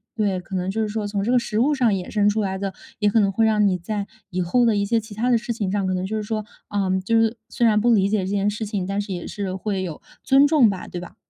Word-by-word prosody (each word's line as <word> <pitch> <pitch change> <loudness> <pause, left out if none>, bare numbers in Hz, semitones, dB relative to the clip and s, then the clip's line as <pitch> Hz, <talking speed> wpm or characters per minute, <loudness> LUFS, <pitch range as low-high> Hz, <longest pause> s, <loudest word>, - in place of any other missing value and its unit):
对， 200 -4 0
可 190 +2 -7
能 185 0 -1
就 220 +3 -1
是 215 - 0
说 210 -1 -3
从 200 -1 -2
这 230 - 0
个 250 - +4
食 220 -2 -2
物 280 +6 +3
上 250 -5 +2
衍 185 -2 -3
生 205 -1 +2
出 215 +1 0
来 190 -2 -2
的， 195 0 -3 0.3
也 210 - +3
可 225 - +3
能 200 - +2
会 225 +4 +2
让 215 -1 +3
你 185 - +1
在 200 +3 -4 0.2
以 185 0 -1
后 240 +8 +2
的 225 -2 +3
一 200 - +1
些 230 +2 +2
其 220 0 -10
它 235 +4 0
的 240 - +5
事 235 +1 -3
情 200 -4 -2
上， 200 -2 0
可 185 - 0
能 185 0 -2
就 220 +3 -3
是 215 - -3
说， 215 0 -3 0.2
嗯， 190 -2 0
就 225 +4 +2
是 225 +1 +1
虽 240 - 0
然 215 -2 +4
不 240 +3 +3
理 200 -2 +3
解 215 0 +1
这 185 - -2
件 200 +1 +1
事 210 +2 -4
情， 200 -3 -3
但 195 +1 -2
是 200 -1 -5
也 175 -2 -5
是 195 -3 -4
会 195 0 -2
有 170 -5 -6 0.2
尊 275 +1 +5
重 285 -6 +5
吧， 190 -2 -5
对 175 - -6
吧？ 180 - -11
205 Hz, 335 characters per minute, -23 LUFS, 190-225 Hz, 0.3 s, 的